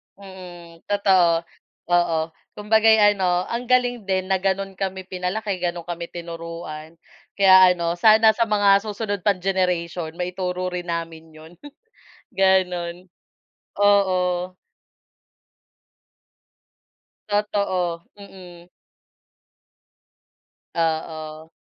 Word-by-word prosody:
Mhm, 180 -4 -13
totoo, 185 -5 +3 0.5
oo, 175 -2 +2 0.4
kumbaga'y 220 +1 +4
ano 180 -2 0
ang 240 +1 -4
galing 245 -4 +1
din, 190 0 -1
na, 190 - +2
ganun 195 0 -2
kami 190 -1 -4
pinalaki 185 +2 -4
ganun 175 -1 -3
kami 170 0 -6
tinuruan, 165 -2 -8 0.4
kaya, 190 -2 +6
ano, 170 0 -2
sana 220 0 +6
sa 230 +1 -1
mga 200 -1 +4
susunod 205 -1 -3
pang 195 -3 0
generation 175 -3 -1
maituro 180 0 -3
rin 175 -1 -5
namin 165 -1 -6
'yon, 160 +2 -14 0.8
ganu'n, 180 -2 0 0.7
oo. 185 -3 +2 2.7
Totoo, 195 -5 -1
mhm. 180 -3 -14 2.1
Oo. 160 -1 -3
180 Hz, 90 wpm, -22 LUFS, 170-200 Hz, 2.7 s, kaya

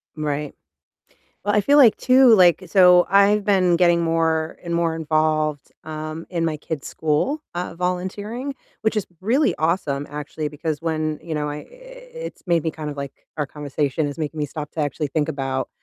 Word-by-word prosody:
Right. 150 -1 -3 0.9
Well, 205 +1 0
I 210 - +4
feel 285 +8 +4
like 250 -7 +7
too, 255 -1 +6
like 180 -3 +5
so 180 -2 +6
I've 200 +1 +4
been 185 -4 +3
getting 170 -1 +4
more 165 -1 0
and 170 -1 -4
more 170 -1 +1
involved, 155 -2 0
um, 155 +1 -6
in 170 -2 -1
my 160 -2 -1
kids' 150 -1 -6
school, 160 - 0
uh, 175 -1 -4
volunteering, 205 +9 -3 0.3
which 220 0 0
is 210 - -1 0.2
really 230 - +2
awesome, 155 -4 0
actually, 150 +1 -5
because 150 +1 -4
when, 155 -2 -2
you 160 0 -5
know, 150 0 -1
I 145 - -5
i - - -7 0.7
it's - - -13
made 170 -3 +2
me 160 - -1
kind 155 -1 -6
of, 145 - -7
like 140 -1 -5 0.3
our 150 - 0
conversation 145 +1 -2
is 145 - -6
making 155 -1 -4
me 150 - 0
stop 150 0 -7
to - - -7
actually 150 +1 -1
think 150 +1 -1
about 135 -1 -2
160 Hz, 185 wpm, -22 LUFS, 150-180 Hz, 0.9 s, like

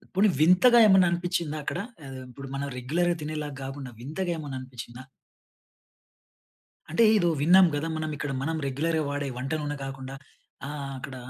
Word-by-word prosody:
పోనీ 200 +3 +5
వింతగా 185 +10 +6
ఏమన్నా 190 -3 +6
అనిపిచిందా 175 -3 -1
అక్కడ? - - -3 0.3
ఆహ్, 135 -1 -8
ఇప్పుడు 135 +2 -9
మనం 140 +1 -3
రెగ్యులర్‌గా 170 +8 0
తినేలాగా 150 -1 -4
కాకుండా, 135 -1 -6
వింతగా 160 +9 -3
ఏమన్న 145 -4 -6
అనిపిచిందా? 125 -1 -9 1.9
అంటే, 170 +9 +3
ఏదో 175 -5 +3
విన్నాం 180 +5 +7
కదా? 145 +3 -2
మనం 155 0 -3
ఇక్కడ 140 0 -3
మనం 160 +3 -1
రెగ్యులర్‌గా 155 +4 0
వాడే 145 0 -2
వంట 130 +2 -4
నూనె 145 0 -3
కాకుండా 135 0 -7 0.5
ఆహ్, 140 -1 -5
అక్కడ 130 +1 -8
150 Hz, 150 wpm, -27 LUFS, 135-175 Hz, 1.9 s, విన్నాం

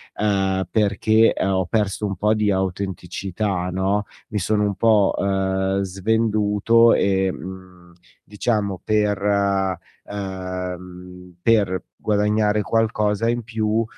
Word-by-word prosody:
ehm, 95 -3 0
perché 110 +1 +3
ho 95 -1 +1
perso 105 0 -1
un 100 -1 -2
po' 105 +4 +2
di 105 -1 +1
autenticità, 95 0 -3
no, 95 +3 0 0.2
mi 105 - -2
sono 105 +3 +1
un 100 -1 0
po', 105 -1 +3
uhm, 95 0 0
svenduto 110 +3 +2
e, 95 -1 +2
mhmm, 90 -1 -11 0.3
diciamo 105 -3 -2
per 105 -1 +2 1.0
ehm, 90 -2 -7
per 100 -4 +2
guadagnare 105 0 +1
qualcosa 110 0 0
in 120 0 0
più, 110 0 0
100 Hz, 105 wpm, -22 LUFS, 95-105 Hz, 1.0 s, perché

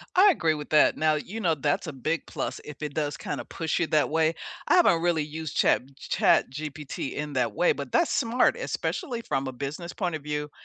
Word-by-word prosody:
I 390 +3 +7
agree 165 - +1
with 150 -1 -7
that. 155 - +5
Now, 155 -1 +2
you 200 +9 -5
know, 165 -6 +2
that's 145 +3 -1
a 155 - -5
big 155 +6 -2
plus - - -4
if 150 0 -10
it 145 -2 -4
does 145 -2 -2
kinda - - -4
push 160 -2 -2
you 170 - +1
that 155 -1 +2
way. 160 0 +2 0.3
I - - +5
haven't 170 - +5
really 170 -3 +2
used 155 0 -6
Chat 130 - +3
b 140 - -21
ChatGPT 150 0 0
in 150 -1 -4
that 120 -5 0
way, 175 - +3
but 140 -3 -7
that's - - +2
smart, 235 +2 +2
especially 240 -4 -3
from 135 -10 -2
a - - -3
business 145 +7 -5
point 180 -3 -2
of 155 - -4
view, 150 0 -3
155 Hz, 220 wpm, -27 LUFS, 145-165 Hz, 0.3 s, I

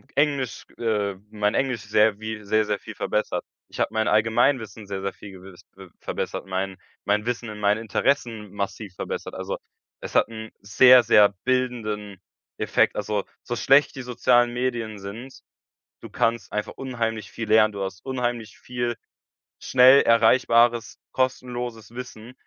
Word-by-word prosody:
Englisch, 140 -5 0
äh, 105 -4 -1 0.2
mein 105 -1 0
Englisch 130 -5 0
sehr 105 -1 +2
wie 110 0 -6
sehr, 110 +1 +1
sehr 105 -1 -1
viel - - -9
verbessert. 105 - -2 0.2
Ich - - -11
habe - - +1
mein 110 0 0
Allgemeinwissen 110 -1 +1
sehr, 95 -1 -4
sehr 100 0 -3
viel 100 - -12
gew 95 0 -13 0.4
verbessert, - - -4
mein 95 0 -3 0.3
mein 105 +1 +1
Wissen 120 -1 -3
in 105 0 -8
meinen 105 +1 +2
Interessen 115 -2 -1
massiv 100 0 -5
verbessert. - - -5
Also, - - -4 0.4
es - - -7
hat - - +4
'n 110 -1 -8
sehr, 125 +5 +7
sehr 105 -2 +6 0.2
bildenden 115 -6 -1 0.4
Effekt. - - +1
Also, 105 -1 -2 0.2
so 120 - -4
schlecht 135 +5 +4
die 135 - -5
sozialen 120 0 +2
Medien 120 -4 -3
sind, 110 +7 -9 0.6
du - - -10
kannst 115 0 -1
einfach 105 0 -3
unheimlich 115 -4 -4
viel 115 - -5
lernen. 110 0 +5
Du 100 -1 -4
hast 95 0 -7
unheimlich 120 -4 -3
viel 120 -1 -3 0.6
schnell 130 +2 +6
erreichbares, 115 0 +3
kostenloses 125 -3 -3
Wissen. 120 -1 -9
110 Hz, 150 wpm, -24 LUFS, 105-125 Hz, 0.6 s, sehr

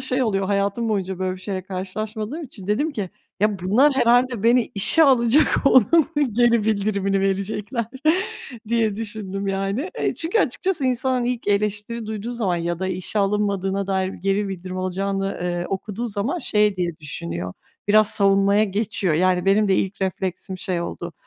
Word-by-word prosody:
şey 255 +1 0
oluyor, 195 -5 0
hayatım 200 +3 0
boyunca 190 -3 -2
böyle 185 0 -2
bir 185 - -14
şeyle 190 -1 -4
karşılaşmadığım 215 - -5
için 210 -8 -10
dedim 260 +10 +1
ki: 200 -7 -4 0.3
"Ya, 210 -1 +2
bunlar 225 +11 +4
herhâlde 245 -2 +3
beni 240 +1 +3
işe 210 +11 +4
alacak, 260 +2 +4
onun 275 +5 +5 0.2
geri 235 -1 +3
bildirimini 200 -2 0
verecekler." 205 +4 -2 0.8
diye 225 -3 +1
düşündüm, 205 -3 -5
yani. 195 - -2
Eee, - - 0
çünkü 335 +7 -1
açıkçası 365 - 0
insan, 255 +1 +1
hani, 250 -1 +1
ilk 230 - -8
eleştiri 210 +2 -1
duyduğu 220 +2 -4
zaman 200 -7 -1
ya 170 0 -2
da 190 - -2
işe 185 +3 -3
alınmadığına 200 -1 0
dair 190 -1 0
geri 195 +1 -1
bildirim 185 0 -6
alacağını, 195 +1 -2
eee, 175 0 -2
okuduğu 210 +4 -4
zaman 220 - -2
şey 210 - +2
diye 175 -3 -2
düşünüyor. 90 - -4 0.4
Biraz 215 0 +5
savunmaya 200 +1 +3
geçiyor. 200 -4 -1
Yani, 180 +2 +2
benim 200 +1 +3
de 190 - +4
ilk 195 +1 -2
refleksim 190 0 -3
şey 180 -1 -2
oldu, 170 0 -5
200 Hz, 160 wpm, -22 LUFS, 190-230 Hz, 0.8 s, onun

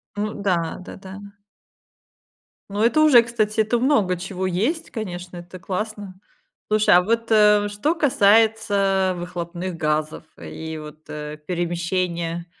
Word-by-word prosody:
Ну 210 +1 -2
да, 180 -5 -1
да-да. 190 +1 -10 1.5
Ну, 205 +2 -3
это 245 +7 +3
уже, 260 -7 +7
кстати, 220 -2 0
это 225 +3 +1
в - - -4
много 210 - +2
чего 185 +1 -4
есть, 235 - -1
конечно, 180 -5 -6
это 175 +1 -10
классно. 200 0 -5 0.5
Слушай, 215 -4 +4
а 180 - +7
вот, 230 +3 -1
э, 210 -1 +5
что 290 +12 -1
касается 205 - +3
выхлопных 175 0 -5
газов 155 -1 -2 0.2
и 160 0 -7
вот, 155 0 -11
э, 150 0 -6
перемещения. 175 -1 -2
190 Hz, 130 wpm, -22 LUFS, 175-215 Hz, 1.5 s, уже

